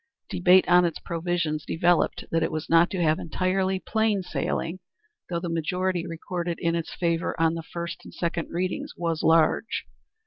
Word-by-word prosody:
Debate 180 +1 +5
on 180 0 +6
its 170 -3 0
provisions 165 -2 -2
developed 175 +1 +1
that 165 - +2
it - - 0
was 155 0 -4
not 165 +1 +6
to 190 - -3
have 155 0 +2
entirely 185 +3 0
plain 220 -1 0
sailing, 175 0 -2 0.5
though 170 -1 -1
the 175 - -4
majority 175 +2 -1
recorded 170 +1 -4
in 165 0 +1
its 170 -1 -3
favor 170 -1 -1
on 165 0 +3
the 165 - -4
first 170 +1 -6
and - - -11
second 170 -1 -2
readings 180 +2 -3
was 165 -2 -1
large. 165 +7 +2
170 Hz, 170 wpm, -26 LUFS, 165-180 Hz, 0.5 s, on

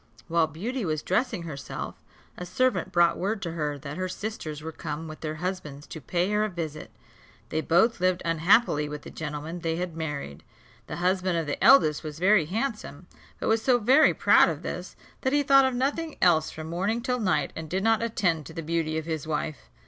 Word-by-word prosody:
While 165 -1 +2
Beauty 220 - -4
was 155 -4 -2
dressing 195 -1 0
herself, 145 -4 -7 0.3
a - - -7
servant 200 +1 0
brought 175 -1 +3
word 200 +3 -1
to 170 - -3
her 150 -3 -2
that 140 +2 -7
her 185 0 -2
sisters 170 -8 -5
were 160 - -5
come 155 +1 -6
with 155 0 -9
their 155 -1 -3
husbands 155 -4 -5
to 160 - -9
pay 180 +6 -1
her 210 0 +2
a 215 - 0
visit. 160 -4 -6 0.6
They 155 - -1
both 180 +9 +3
lived 185 0 +1
unhappily 165 -1 +3
with 150 0 -7
the - - -10
gentlemen 155 +2 -5
they 165 -1 -1
had 175 -1 -4
married. 145 - -5 0.4
The - - -5
husband 185 0 +1
of 165 - -1
the 145 - -3
eldest 155 - +6
was 155 -1 -6
very 185 0 +4
handsome; 210 - -4 0.3
but - - -3
was 225 0 +2
so 250 +1 +4
very 260 +7 +5
proud - - +5
of - - -5
this, - - -6 0.3
that 260 0 0
he 290 0 +3
thought 275 -1 +6
of 260 -1 0
nothing 290 +5 -1
else 165 -4 +4
from 155 - -8
morning 195 +8 -1
till 250 -1 -1
night, 180 -10 0
and 160 -1 -6
did 190 +3 -1
not 225 0 +3
attend 185 -9 0
to 160 - -10
the 165 - -4
beauty 160 0 -1
of 160 - -3
his 160 -2 -4
wife. 150 - -4
170 Hz, 210 wpm, -27 LUFS, 155-215 Hz, 0.6 s, eldest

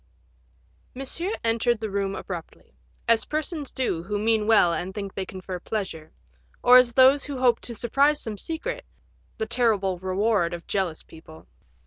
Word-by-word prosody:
Monsieur 335 - -3
entered 230 0 +1
the 220 -2 -4
room 195 0 -1
abruptly, 170 - -8 0.3
as 230 -1 +4
persons 310 -1 -3
do 245 -10 -1
who 205 +4 -3
mean 215 0 +1
well 210 -6 +5
and 185 +3 -4
think 200 -2 -5
they 190 -1 -4
confer 185 -1 -7
pleasure, 180 -6 -5 0.5
or 250 +1 +8
as 245 -2 +2
those 265 +3 +5
who 285 -2 -5
hope 245 -2 +3
to 235 - -4
surprise 280 +7 +2
some 215 -3 -5
secret, 330 +10 -4 0.5
the 220 - -2
terrible 215 -6 +1
reward 190 -1 0
of 170 - -11
jealous 185 -5 -2
people. 160 0 -15
220 Hz, 155 wpm, -25 LUFS, 190-250 Hz, 0.5 s, or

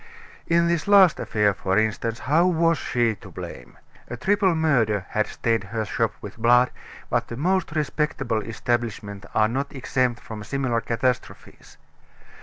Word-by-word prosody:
In 170 0 +3
this 170 0 0
last 195 -5 +6
affair, 105 -2 +1
for 95 0 -1
instance, 110 +1 0
how 165 +6 +3
was 165 -2 +2
she 120 -2 +1
to - - -13
blame? - - -9 0.3
A 120 - -6
triple 195 - +2
murder 115 - +1
had 110 0 0
stained 115 -3 -1
her 110 +3 -3
shop - - -1
with - - -9
blood; 120 +2 +4 0.4
but - - +1
the 115 - -7
most 180 +1 0
respectable 150 -6 -1
establishments 110 -3 -3
are 110 - +4
not 135 +5 -3
exempt 125 -2 0
from 110 -2 -8
similar 125 0 -1
catastrophes. 120 +2 -3
120 Hz, 150 wpm, -24 LUFS, 110-160 Hz, 0.4 s, last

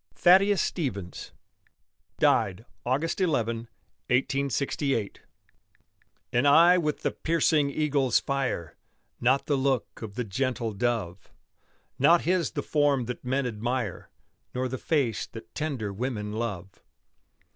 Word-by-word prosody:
THADDEUS 195 +2 +5
STEVENS 100 - -4 0.9
DIED 100 +4 +2 0.2
AUG. 130 +5 +1 0.2
11, 185 - +3 0.8
1868 135 -2 0 1.1
An 120 +4 +3
eye 170 +5 +7
with 150 -3 -2
the - - +1
piercing 160 -3 +1
eagle's 140 -4 +2
fire, 135 - -2 0.4
Not 130 +3 +2
the 145 - +1
look 135 -2 -1
of 110 -3 -7
the 125 - -1
gentle 115 +1 -2
dove; 100 -5 -2 0.7
Not 165 +6 +5
his 180 0 0
the - - -3
form 145 -4 +2
that 125 +1 -6
men 130 +2 0
admire, 120 -2 -3 0.5
Nor 130 +1 0
the 130 0 -5
face 135 -9 0
that 115 - -12
tender 135 -10 -3
women 105 -1 -3
love. 105 -4 -5
130 Hz, 115 wpm, -27 LUFS, 110-145 Hz, 1.1 s, eye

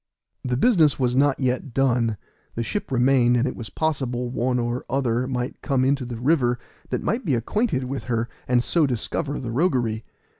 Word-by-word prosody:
The 125 -1 -1
business 160 - +4
was 125 -2 +1
not 140 +1 +3
yet 130 -1 -1
done; 120 -5 +2 0.4
the 115 - -1
ship 205 - -4
remained, 125 -1 +4
and 120 +3 +1
it 130 - -3
was 110 -4 -7
possible 125 -3 -1
one 125 0 0
or 120 +1 -2
other 125 -2 0
might 125 -1 -3
come 135 -3 +1
into 135 -1 +1
the 120 -1 -5
river 125 -1 +2 0.3
that - - -2
might 230 +5 -1
be 150 - +1
acquainted 140 - 0
with 130 +2 -4
her, 115 -2 -1 0.2
and 120 -1 +3
so 160 +1 +2
discover 135 +4 -2
the 120 -3 -5
roguery. 120 -6 +1
125 Hz, 185 wpm, -24 LUFS, 120-140 Hz, 0.4 s, business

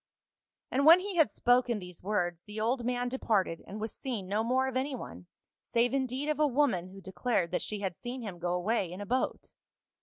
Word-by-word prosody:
" - - -60
And 275 - +2
when 330 +4 +9
he 385 -1 -4
had 320 -4 +5
spoken 245 -1 +2
these 180 -3 -9
words 175 -4 -1
the 210 0 -7
old 240 +3 0
man 245 0 0
departed 210 -9 0
and 210 - -7
was 220 0 -4
seen 235 -9 -4
no 210 +3 0
more 255 +3 +2
of 265 - -4
any 265 +1 0
one, 90 - -9 0.3
save 240 +2 +1
in 265 -1 +1
deed 260 +4 -3
of 305 0 0
a 305 - +5
woman 250 -10 +1
who 195 +1 -12
declared 190 -2 -1
that - - 0
she 210 -1 -4
had 190 -3 -2
seen 245 +3 -6
him 190 -5 -6
go 175 +1 -1
away 185 0 0
in 180 - -7
a 205 - -5
boat. 255 +5 -1
230 Hz, 225 wpm, -30 LUFS, 190-260 Hz, 0.3 s, when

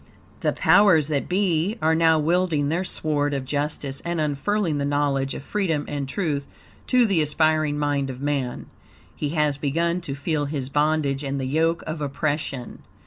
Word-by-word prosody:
The - - +1
powers 160 -3 +4
that 145 -3 -1
be, 185 +1 +1
are 160 -2 +2
now 160 0 +4
wielding 160 -2 +1
their 170 +4 0
sword 145 -5 -1
of 135 -1 -3
justice, 145 -1 -2
and 170 -1 -2
unfurling 155 +3 0
the - - -1
knowledge 140 -1 0
of - - -7
freedom 165 -5 -1
and 140 -2 -4
truth 145 -5 -2 0.4
to 250 -2 +4
the 195 -7 +2
aspiring 155 0 +1
mind 145 -2 0
of 130 -1 -6
man. 140 -3 -2 0.5
He 150 - -2
has 150 -2 +2
begun 170 +5 0
to 140 -5 -5
feel 145 +1 -1
his 140 -3 -4
bondage 150 -1 +1
and 140 0 -2
the 130 - -2
yoke 160 +5 +1
of 155 0 -5
oppression. 145 -2 -3
150 Hz, 170 wpm, -24 LUFS, 140-165 Hz, 0.5 s, powers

